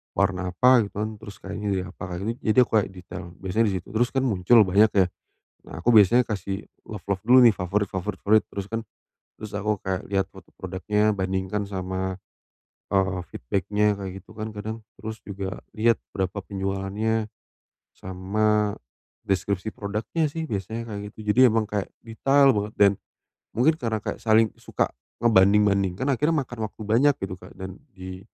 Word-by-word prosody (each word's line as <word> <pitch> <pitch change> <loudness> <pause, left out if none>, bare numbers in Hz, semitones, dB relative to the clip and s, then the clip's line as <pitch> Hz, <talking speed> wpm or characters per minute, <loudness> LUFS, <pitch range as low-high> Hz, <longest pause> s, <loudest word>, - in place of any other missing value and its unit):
warna 95 -1 +1
apa, 125 +4 +6
gitu, - - -20
kan. 105 +1 -1
Terus, 105 -2 -10
kainnya 105 0 -5
dari 95 - -1
apa, 95 +1 -10
akhirnya. 110 +6 -3
Jadi, 110 +3 0
aku - - -10
kayak 100 - -2
detail, 90 0 -8 0.2
biasanya 110 +5 +1
di 100 - 0
situ. 90 - -5
Terus, 120 +3 +2
kan, 130 - +2
muncul 110 0 +5
banyak, 100 +3 +4
ya. - - -1 0.6
Nah, 80 - -9
aku 120 - +5
biasanya 115 +4 +6
kasih 100 -2 -4 0.2
love-love 100 -2 -3
dulu, 125 +4 +6
nih, 115 - +8
favorit-favorit 95 +1 -2
fruit. 110 +1 +5
Terus, 100 -1 -5
kan, 115 - 0 0.5
terus 110 -1 -9
aku 105 0 -1
kayak 95 +1 -3
lihat 95 -1 0
foto - - -16
produknya, 105 +3 0
bandingkan 95 +1 -2
sama, 95 0 -3 0.8
eee, 95 -1 +2 0.2
feedback-nya 105 +8 0
kayak 95 -2 -5
gitu, - - -22
kan, 110 +1 -3
kadang. 110 +2 -5 0.2
Terus, 110 0 -6
juga 95 -1 -5 0.2
lihat 115 +1 +3 0.2
berapa 95 +1 -2
penjualannya, 100 +3 -2 0.7
sama 105 +3 0 0.5
deskripsi 100 +1 0
produknya, 110 +10 -2
sih, 160 0 -4
biasanya 110 +3 -4
kayak 100 - -5
gitu. - - -18 0.2
Jadi, - - +3
emang 110 -2 +1
kayak 105 -2 -3
detail 135 +5 +3
banget, 105 +1 -2
dan 100 -1 +7 0.6
mungkin 145 +7 +3
karena 110 -5 -2
kayak - - -4
saling 110 -1 +4
suka - - -1 0.3
ngebanding-bandingkan, 100 0 +3
akhirnya 150 +4 +2
makan 120 -3 -9
waktu 110 - -11
banyak, 115 +7 +3
gitu, 95 -1 -4
Kak. - - -14
Dan, 95 0 -8 0.2
di 95 0 -9
105 Hz, 165 wpm, -25 LUFS, 95-110 Hz, 0.8 s, nih